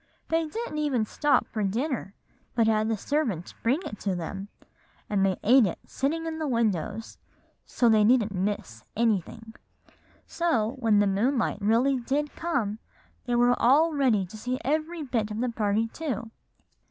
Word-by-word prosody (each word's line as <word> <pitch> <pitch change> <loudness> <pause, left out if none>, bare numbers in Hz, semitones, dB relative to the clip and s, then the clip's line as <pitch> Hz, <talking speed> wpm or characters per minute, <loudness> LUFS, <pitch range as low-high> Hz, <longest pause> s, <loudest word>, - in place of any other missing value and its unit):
They 325 0 +1
didn't 435 -3 -4
even 270 -7 +1
stop 295 +6 +2
for 220 - -4
dinner, 225 0 -2 0.4
but 230 -2 +3
had 215 -1 +2
the 225 - 0
servants 230 - -2
bring 260 +9 +1
it 210 - -7
to 195 -3 -1
them, 195 +3 -5 0.6
and 200 -2 +1
they 190 -2 +1
ate 245 0 +6
it 175 - -4
sitting 320 +5 -2
in 320 -1 -4
the 310 - -2
windows, 225 - -1 0.5
so 240 - +1
they 220 -2 +5
needn't 220 -2 +3
miss 185 - -3
anything; 225 0 -1 0.7
so 245 -11 0
when 225 -4 +3
the 205 - +4
moonlight 215 +3 0
really 235 +6 +3
did 285 +4 -2
come, 235 -11 -2 0.5
they 245 - +1
were 245 +1 +4
all 310 +7 +4
ready 250 -9 +2
to 200 +5 -11
see 250 +4 -3
every 310 +3 -1
bit 230 -6 -1
of 210 +1 -4
the 250 +1 0
party 215 -1 0
too. 235 -6 -4
230 Hz, 165 wpm, -27 LUFS, 210-280 Hz, 0.7 s, ate